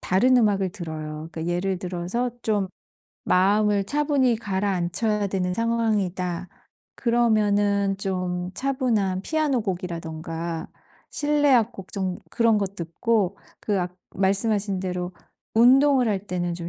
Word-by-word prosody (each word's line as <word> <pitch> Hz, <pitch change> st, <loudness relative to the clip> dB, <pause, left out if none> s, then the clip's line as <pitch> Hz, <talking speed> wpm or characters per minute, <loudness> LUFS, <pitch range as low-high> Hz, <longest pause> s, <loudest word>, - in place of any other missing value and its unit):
다른 250 Hz, +8 st, +3 dB
음악을 200 Hz, -5 st, +2 dB
들어요. 155 Hz, -4 st, -6 dB
그러니까 160 Hz, +1 st, -5 dB
예를 185 Hz, +1 st, -1 dB
들어서 185 Hz, +8 st, -2 dB
'좀 205 Hz, -3 st, +1 dB, 0.6 s
마음을 200 Hz, +2 st, +3 dB
차분히 280 Hz, -1 st, +2 dB
가라앉혀야 200 Hz, 0 st, 0 dB
되는 180 Hz, -1 st, -1 dB
상황이다.' 195 Hz, -6 st, -1 dB, 0.5 s
그러면은 205 Hz, -4 st, +2 dB
좀 180 Hz, -2 st, -2 dB
차분한 230 Hz, -8 st, 0 dB
피아노곡이라든가 170 Hz, -, -2 dB, 0.4 s
실내 290 Hz, -1 st, +2 dB
악곡 225 Hz, -5 st, 0 dB
좀 185 Hz, -2 st, -2 dB
그런 230 Hz, -2 st, +3 dB
거 200 Hz, -, 0 dB
듣고 195 Hz, +2 st, -1 dB, 0.2 s
그 205 Hz, -2 st, 0 dB
악 180 Hz, 0 st, -4 dB, 0.2 s
말씀하신 200 Hz, 0 st, +1 dB
대로 180 Hz, -1 st, -3 dB, 0.4 s
운동을 260 Hz, +2 st, +5 dB
할 205 Hz, -1 st, -2 dB
때는 175 Hz, -2 st, -2 dB
좀 170 Hz, 0 st, -5 dB
195 Hz, 275 characters per minute, -24 LUFS, 180-230 Hz, 0.6 s, 운동을